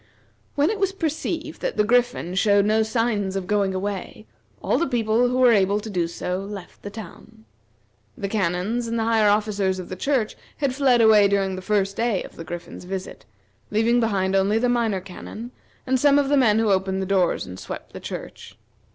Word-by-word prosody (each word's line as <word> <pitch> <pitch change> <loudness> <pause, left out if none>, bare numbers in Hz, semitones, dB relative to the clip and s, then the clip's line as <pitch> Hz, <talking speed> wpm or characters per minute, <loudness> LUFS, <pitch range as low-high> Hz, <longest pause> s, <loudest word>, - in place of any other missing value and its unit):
When 290 +6 +2
it 435 - -4
was 390 -1 +1
perceived 325 -1 -3
that - - -3
the - - +4
Griffin 245 -5 +1
showed 200 +1 +3
no 215 +1 +3
sign 220 -2 0
of 190 - -4
going 200 -1 0
away, 200 +2 -5 0.3
all - - 0
the 340 - +1
people 235 -1 +2
who 250 - -1
were 255 -2 +6
able 200 -1 +3
to 215 +1 -7
do 175 -3 0
so 180 +2 -3
left 195 -1 -9
the 205 - -6
town. 220 +2 -12 0.7
The 200 -5 -3
canons 200 +4 -1
and 230 0 -2
the 225 - 0
higher 220 -2 +3
officers 205 -2 +1
of 185 - -7
the 185 - -5
church 245 +1 0 0.2
had 280 -3 0
fled 260 -3 +3
away 215 -2 +6
during 195 -1 0
the 185 - -6
first 200 0 0
day 230 -4 0
of - - -12
the 165 - -8
Griffin's 175 +2 -8
visit, 190 0 -6 0.4
leaving 225 +3 +2
behind 195 -4 +1
only 195 +3 +2
the 245 +2 +1
Minor 230 -6 +1
Canon 215 +5 -9 0.3
and 260 0 +1
some 285 +1 +5
of 280 -1 +2
the 290 - +4
men 220 -5 +4
who 220 -2 +2
opened 190 0 0
the 190 - -2
doors 190 -2 +1
and 90 0 -9
swept - - -8
the - - -7
church. - - -8
210 Hz, 205 wpm, -23 LUFS, 195-240 Hz, 0.7 s, were